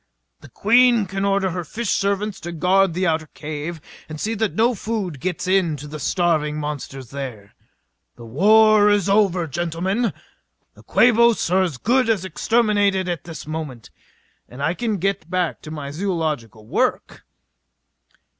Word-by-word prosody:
The - - -15
Queen 235 0 +4
can 195 +1 -4
order 195 -1 +1
her 180 0 -4
fish 225 +6 -4
servants 200 0 -1
to 175 - -6
guard 180 +1 +2
the 185 +1 0
outer 160 -2 0
cave 155 +2 -5 0.3
and 155 -1 -7
see 220 +6 -2
that 220 -1 -1
no 235 +3 +3
food 200 - -4
gets 180 +5 -3
in 185 -5 +2
to 145 +2 -9
the 150 +1 -7
starving 155 -3 0
monsters 140 -4 -6
there. 125 -8 -7 0.6
The 120 - -12
war 210 - +5
is 205 -2 +2
over, 195 -4 +2
gentlemen. 175 - -1 0.6
The - - -18
Quabos 235 -5 +3
are 190 +1 +4
as 170 -8 -1
good 250 - +2
as 200 -5 +1
exterminated 205 0 +1
at 175 -5 -4
this 165 -2 -8
moment. 150 -6 -6 0.6
And 130 +3 -7
I 160 +3 +1
can 220 +1 -2
get 190 -3 -2
back 180 -2 -1
to 155 - -10
my 145 -3 -6
zoological 155 - -3
work...." - - -1
180 Hz, 155 wpm, -21 LUFS, 155-205 Hz, 0.6 s, war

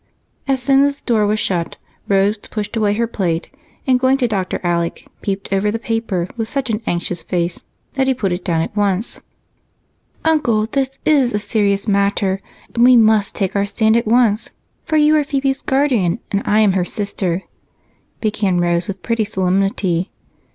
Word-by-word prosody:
As 270 -1 +1
soon 270 +1 +4
as 285 0 0
the - - -29
door 220 -4 +2
was 215 +1 +1
shut 170 -5 -1 0.3
Rose 200 +1 +3
pushed 210 +1 -6
away 210 -2 +1
her 235 +2 +1
plate 180 -7 -2 0.3
and, 255 -1 +3
going 260 +1 +3
to 250 -3 +1
Dr. 195 -4 -2
Alec, 170 -1 -1
she - - -24
peeped 195 -1 -3
over 195 +2 +1
the 220 - -1
paper 225 -6 -2
with 225 -2 -3
such 275 -4 -2
an 215 +1 -2
anxious 175 0 -2
face 175 +1 -2 0.3
that 265 -1 0
he 265 - +2
put 200 -6 -1
it 175 +1 -4
down 165 -2 0
at 205 - -7
once. 205 +1 0 1.1
"Uncle, 240 -10 +2
this 270 +3 -2
is 275 -6 +3
a - - +1
serious 205 -1 0
matter, 200 -1 +1 0.3
and 235 - +2
we 250 0 +7
must 215 -2 +3
take 195 0 -2
our 200 0 +1
stand 220 +1 +2
at 230 -1 +1
once, 230 -2 +2 0.4
for 315 - +1
you 300 0 +5
are 300 - +3
Phebe's 275 -2 -1
guardian 255 -11 +1
and 200 - 0
I 210 +1 +4
am 210 -2 +4
her 185 -1 +1
sister," 190 -2 -2 0.8
began 210 -4 0
Rose 175 0 +1
with 195 -2 -6
pretty 230 -1 0
solemnity. 190 -2 0
210 Hz, 185 wpm, -18 LUFS, 190-240 Hz, 1.1 s, we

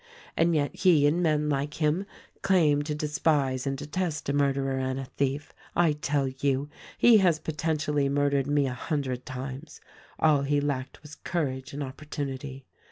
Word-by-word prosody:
And 165 0 +3
yet 145 -2 0
he 170 -6 +5
and 155 +4 +2
men 150 -3 +2
like 145 0 -1
him 155 +5 0 0.3
claim 165 -7 +3
to 150 -1 -2
despise 145 -3 0
and 135 0 -1
detest 150 +1 -3
a - - +1
murderer 135 -1 +1
and 130 0 -2
a 135 - -4
thief. 140 +2 -3 0.2
I 170 -2 +4
tell 145 -2 0
you, 135 +2 -1 0.3
he 235 -3 +7
has 175 -5 +3
potentially 155 -2 -1
murdered 140 -1 +1
me 145 -1 +2
a 130 - -2
hundred 130 -1 -3
times. 130 +4 -7 0.4
All 150 -3 +4
he 145 +1 +1
lacked 140 -1 -3
was 150 0 -11
courage 130 -8 -3
and 145 +1 -4
opportunity. 135 -1 -6
145 Hz, 165 wpm, -27 LUFS, 135-155 Hz, 0.4 s, he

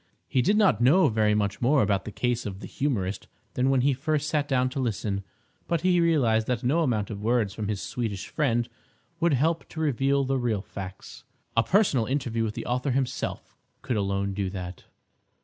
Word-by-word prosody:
He 130 - +2
did 205 +10 +3
not 205 - +4
know 155 +7 +5
very 105 -1 +2
much 105 -1 -1
more 135 +2 +4
about 100 -2 0
the 105 - -5
case 120 0 -1
of 95 -1 -6
the - - -8
humorist 105 -9 -2 0.3
than 130 +1 +1
when 135 -2 +3
he 140 +2 +3
first 150 +2 -1
sat 150 -2 0
down 130 -2 +2
to 140 - -4
listen; 105 -5 -2 0.4
but 170 -2 0
he 180 -1 +3
realised 120 -10 +2
that 125 -4 -1
no 140 +7 +2
amount 115 -9 0
of 100 -1 -6
words 110 -3 +1
from 105 -1 -4
his 105 -2 -3
Swedish 110 -6 -4
friend 120 -5 0 0.5
would 170 -2 +3
help 160 +5 0
to 160 - -8
reveal 140 -2 +1
the 135 0 0
real 110 -5 -1
facts. 95 -2 -9 0.3
A 115 - +5
personal 150 - +2
interview 120 -4 -1
with 110 -1 -3
the - - -5
author 125 +3 -1
himself 130 0 -2 0.3
could 125 - -1
alone 100 -1 -1
do 95 -1 -2
that. 90 -2 -7
125 Hz, 200 wpm, -26 LUFS, 105-140 Hz, 0.5 s, know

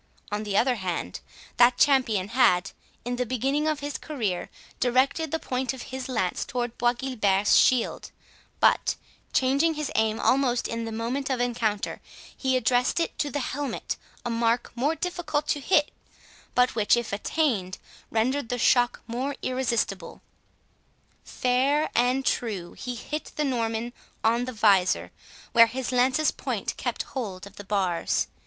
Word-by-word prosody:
On 210 0 -1
the 205 -2 -1
other 250 -1 +3
hand, 185 -3 -3 0.4
that 245 0 +6
champion 230 -9 +3
had, 220 -7 +3 0.3
in 245 0 -2
the 250 - +1
beginning 270 +5 0
of 305 -2 -1
his 290 0 -4
career, 220 - -3 0.3
directed 270 +6 +2
the 320 - 0
point 255 -4 -2
of 255 - -8
his 260 0 -5
lance 225 -8 -1
towards 245 -2 -3
Bois 240 0 +3
Guilbert's 210 -6 +1
shield, 250 -3 +3 0.5
but, - - +3 0.4
changing 280 +5 +2
his 300 -2 -3
aim 220 0 +1
almost 255 -2 +2
in 230 0 -3
the 225 - -5
moment 240 +5 -2
of 260 -2 0
encounter, 230 -4 -1 0.3
he 260 -1 +1
addressed 250 +5 +2
it 335 - -1
to 290 - 0
the 285 +1 -2
helmet, 285 0 -3 0.3
a 240 - -1
mark 230 +1 +1
more 280 +7 0
difficult 325 -4 -2
to 290 - +1
hit, 295 0 +2 0.6
but 250 0 +4
which, 215 +1 +3
if 240 -4 -3
attained, 205 - 0 0.3
rendered 240 +3 0
the 245 - -1
shock 245 +1 +3
more 255 +4 -3
irresistible. 255 -2 -2 1.0
Fair 265 +5 +1
and 250 +3 +2
true 200 -7 -2
he 250 -1 -6
hit 300 +6 -6
the 300 - 0
Norman 235 -2 -1 0.3
on 235 +2 +2
the 255 - -4
visor, 200 -5 +3 0.4
where 230 -1 +7
his 255 +2 -4
lance's 255 +4 +3
point - - -3
kept - - -3
hold 200 -8 -6
of 200 0 -14
the 205 - -8
bars. 190 -4 0
245 Hz, 155 wpm, -26 LUFS, 225-270 Hz, 1.0 s, where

